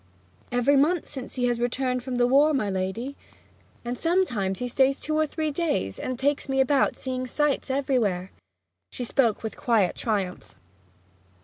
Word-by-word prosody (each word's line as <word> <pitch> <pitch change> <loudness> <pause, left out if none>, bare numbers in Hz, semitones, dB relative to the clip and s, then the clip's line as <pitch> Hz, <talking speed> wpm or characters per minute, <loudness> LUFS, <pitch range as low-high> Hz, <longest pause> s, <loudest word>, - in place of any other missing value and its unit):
'Every 245 +3 +3
month 310 +5 +3
since 265 -3 -6
he 250 -1 +1
returned 250 +2 -1
from 255 0 -4
the 245 0 +3
war, 285 +4 +4
my 210 -7 0
lady. 190 +9 -3 0.7
And 245 +1 -3
sometimes 250 - +1
he 250 - -2
stays 265 +3 +2
two 310 - -2
or 310 0 +2
three 310 0 -2
days, 290 - -1
and 255 -1 -3
takes 280 +2 0
me 270 0 +1
about 270 0 +3
seeing 255 -1 -4
sights 295 +1 0
everywhere!' 240 -9 0 0.6
She 250 - -5
spoke 235 -3 +1
with 220 - -4
quiet 215 -7 +1
triumph. 200 -5 -3
255 Hz, 155 wpm, -26 LUFS, 235-280 Hz, 0.7 s, war